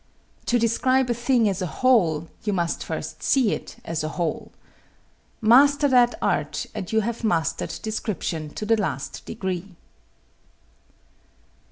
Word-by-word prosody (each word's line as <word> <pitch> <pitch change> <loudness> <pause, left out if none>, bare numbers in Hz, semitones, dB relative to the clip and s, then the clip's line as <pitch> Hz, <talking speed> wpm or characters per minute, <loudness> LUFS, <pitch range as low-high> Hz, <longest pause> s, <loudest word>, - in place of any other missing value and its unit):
To 245 - +3
describe 245 +2 +2
a - - +3
thing 240 -1 +2
as 190 -2 -1
a 180 - -1
whole 170 -9 +2 0.2
you 210 - -1
must 170 -3 -1
first 160 0 -5
see 255 -7 +3
it - - -5
as 165 -1 -2
a - - -1
whole. 170 -1 -3 0.9
Master 280 +6 +5
that 245 -2 +4
art - - 0
and 180 - -5
you 220 0 +3
have 235 +2 -4
mastered 170 -7 -1
description 195 -7 -3
to 215 - -4
the 225 0 +2
last 140 -8 -4
degree. 185 -1 -4
215 Hz, 140 wpm, -24 LUFS, 170-240 Hz, 0.9 s, Master